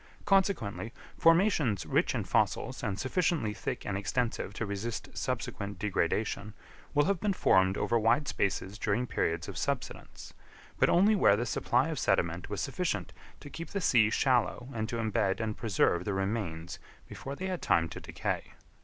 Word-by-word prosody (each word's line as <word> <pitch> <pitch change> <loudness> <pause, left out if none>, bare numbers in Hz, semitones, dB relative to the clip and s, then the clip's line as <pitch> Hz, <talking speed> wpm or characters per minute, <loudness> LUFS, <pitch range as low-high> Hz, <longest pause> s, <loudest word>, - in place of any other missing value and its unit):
Consequently, 190 - +1 0.2
formations 165 - +3
rich - - +1
in - - -1
fossils - - 0
and 100 -2 -2
sufficiently 145 - 0
thick 100 - -4
and 100 - -2
extensive 110 +2 -1
to 115 - -2
resist 105 +3 -5
subsequent 100 -1 -3
degradation, 105 +2 -1 0.4
will 145 0 +4
have 195 -2 +1
been 205 +1 +1
formed 95 - +3
over 120 -1 +1
wide 125 +7 +2
spaces 100 +1 -1
during 110 +3 0
periods 80 -8 -1
of - - -5
subsidence, - - -4 0.5
but - - +4
only 205 +5 +5
where 100 - +5
the 120 +4 -1
supply 115 - +1
of - - -3
sediment 85 +1 0
was - - -3
sufficient - - -2 0.3
to 145 - -11
keep 165 - -7
the 200 - -2
sea 120 - +4
shallow 125 +1 +1
and 110 -1 -3
to - - -3
embed 105 -4 0
and 110 -2 -2
preserve 95 -5 +1
the 100 0 -2
remains 95 -4 -3 0.3
before 135 +1 -7
they 185 - -5
had 185 -2 -3
time 85 -1 +2
to - - -8
decay. - - -4
110 Hz, 165 wpm, -30 LUFS, 100-145 Hz, 0.5 s, only